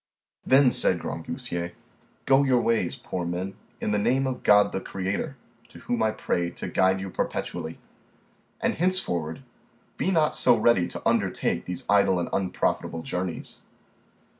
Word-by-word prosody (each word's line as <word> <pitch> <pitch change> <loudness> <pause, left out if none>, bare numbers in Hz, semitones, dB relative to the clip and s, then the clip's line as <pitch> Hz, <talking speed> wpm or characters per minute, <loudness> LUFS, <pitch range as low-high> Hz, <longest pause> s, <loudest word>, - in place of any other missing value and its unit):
Then, 130 -1 +5
said - - +3
Grangousier, 85 0 -5 0.5
go 135 0 +5
your 130 -3 +3
ways, 115 -1 +1
poor 90 - -5
men, 90 +3 -3 0.2
in - - -2
the 105 - +2
name 130 +6 +2
of 130 -1 -3
God 105 0 +5
the 95 - -3
Creator, 100 +11 -3 0.3
to - - -13
whom 120 -2 -2
I 110 - +3
pray 85 -5 -1
to - - -7
guide 95 +1 +2
you 95 0 -5
perpetually, 80 -2 -3 0.8
and - - +1
henceforward 90 - -1 0.5
be - - 0
not 160 -5 +2
so - - +4
ready 115 -7 +3
to - - -4
undertake 60 - 0
these 90 0 -4
idle 100 -2 +4
and 85 - -2
unprofitable 90 -3 -1
journeys. 90 -1 -4
95 Hz, 150 wpm, -26 LUFS, 90-125 Hz, 0.8 s, Then